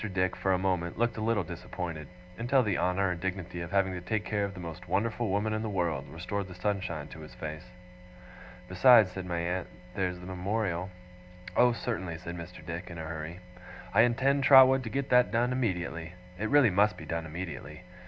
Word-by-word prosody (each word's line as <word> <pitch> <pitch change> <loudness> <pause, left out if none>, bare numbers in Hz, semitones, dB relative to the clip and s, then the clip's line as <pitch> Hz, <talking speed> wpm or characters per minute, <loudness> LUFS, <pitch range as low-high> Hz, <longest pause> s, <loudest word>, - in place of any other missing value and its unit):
Dick, 95 0 +1
for 95 - 0
a 95 - +3
moment, 90 -2 -1
looked 120 +1 0
a - - -3
little 110 -2 +1
disappointed; 85 -2 -6 0.3
until 125 +5 +2
the 105 -4 0
honour 90 +1 +1
and 85 -1 -5
dignity 90 -2 -4
of 85 - -5
having 95 -1 +1
to 90 - -5
take 105 +4 -2
care 105 -2 0
of 100 -1 -3
the - - -8
most 85 +1 -8
wonderful 110 +4 0
woman 105 +3 0
in 110 - -1
the 110 - -3
world, 85 -8 -1
restored 90 +5 -4
the 90 - -10
sunshine 90 -6 -2
to 80 - -11
his 75 - -11
face. 80 +3 -6 1.0
'Besides,' 95 +2 +6
said 90 0 -6
my 85 -1 -2
aunt, 90 +2 -2 0.3
'there's 90 -1 -2
the 90 - -10
Memorial 95 0 -2 0.3
' 90 0 -15
'Oh, 125 0 +6
certainly,' 95 -8 -3
said 85 0 -7
Mr. 85 -1 -9
Dick, 85 +2 -5
in 85 - -8
a 80 - -5
hurry, 80 +2 -6 0.5
'I - - +6
intend, 135 +4 +3
Trotwood, 130 -1 +8
to - - -3
get 135 +4 -2
that 125 0 +5
done 120 +2 +2
immediately 90 -8 -2 0.3
it 110 +1 -1
really 145 -7 +5
must 105 +3 +3
be - - -9
done 80 -1 -3
immediately! 80 -1 -7
90 Hz, 205 wpm, -30 LUFS, 85-110 Hz, 1.0 s, Trotwood